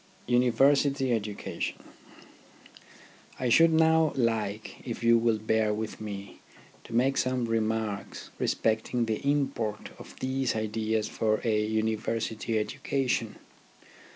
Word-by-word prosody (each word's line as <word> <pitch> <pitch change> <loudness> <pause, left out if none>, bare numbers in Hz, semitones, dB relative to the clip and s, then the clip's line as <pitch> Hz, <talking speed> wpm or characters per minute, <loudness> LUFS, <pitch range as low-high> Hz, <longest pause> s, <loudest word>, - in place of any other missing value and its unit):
UNIVERSITY 135 +2 +3
EDUCATION 105 -2 -3 1.6
I 125 - 0
should 165 +7 +6
now 160 -1 +4
like, 110 -4 -1
if 120 -2 -5
you 115 0 +6
will 115 -1 +2
bear 110 0 +1
with 110 0 -5
me, 100 -2 -7 0.5
to - - -10
make 130 +3 +2
some 130 -1 0
remarks 110 -2 -2
respecting 115 +2 0
the 110 -1 -1
import 135 -7 -1
of - - -12
these 130 -1 -1
ideas 110 0 -1
for 110 -1 0
a 110 -2 +1
University 110 +1 -1
education. 120 +1 -1
115 Hz, 110 wpm, -28 LUFS, 110-130 Hz, 1.6 s, should